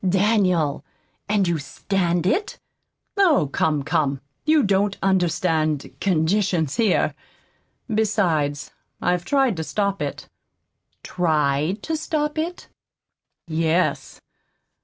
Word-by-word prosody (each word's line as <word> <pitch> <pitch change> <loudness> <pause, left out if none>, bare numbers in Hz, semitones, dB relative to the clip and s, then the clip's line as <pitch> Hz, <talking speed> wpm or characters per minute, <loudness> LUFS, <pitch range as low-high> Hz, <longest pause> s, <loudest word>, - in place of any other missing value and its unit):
"DANIEL! 185 -7 +2 0.5
And 205 -3 +2
you 170 -2 0
stand 175 +3 -1
it?" 390 - 0 0.6
"Oh, 310 - +3
come, 150 -3 +1
come! 140 -1 0 0.3
You 310 -2 +4
don't 200 0 +1
understand 165 -5 +1
conditions 180 -3 +1
here. 225 -5 +2 0.7
Besides, 180 - 0 0.3
I've 180 -1 0
tried 270 -7 +2
to 160 - -2
stop 200 +5 -1
it." - - -4 0.8
"TRIED 155 +1 0
to 320 - -2
stop 305 -1 -2
it!" 345 +3 -4 0.8
"Yes. 165 +2 0
185 Hz, 95 wpm, -22 LUFS, 160-210 Hz, 0.8 s, You